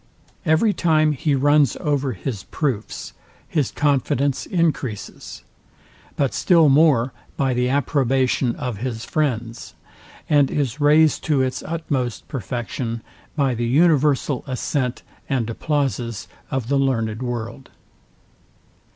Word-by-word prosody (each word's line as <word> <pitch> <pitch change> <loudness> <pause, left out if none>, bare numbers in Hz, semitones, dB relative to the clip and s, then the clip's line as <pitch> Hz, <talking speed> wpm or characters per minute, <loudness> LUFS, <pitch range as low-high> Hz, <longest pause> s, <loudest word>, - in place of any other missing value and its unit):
Every 160 +8 +3
time 155 -4 +3
he 145 0 0
runs 145 0 +3
over 140 -3 0
his 105 +1 -5
proofs, 130 -9 -3 0.3
his 150 -6 0
confidence 140 -1 0
encreases; 155 - -2 0.7
but 140 -3 0
still 155 +3 +4
more 135 -4 +4 0.2
by 135 -2 +1
the 125 0 +1
approbation 135 -3 +1
of 125 -7 -4
his 115 0 -4
friends; 120 -6 -2 0.5
and 145 -3 +4
is 145 -1 -2
raised 155 +1 +4
to 145 -4 +2
its 130 0 -2
utmost 145 -8 -3
perfection 120 -1 -4 0.3
by 140 -4 +1
the 120 0 -2
universal 145 -1 +2
assent 130 0 -2 0.3
and 130 -5 0
applauses 120 - -2 0.2
of 130 -4 -2
the 140 +1 +2
learned 115 -4 0
world. 120 +1 -5
135 Hz, 115 wpm, -22 LUFS, 120-150 Hz, 0.7 s, still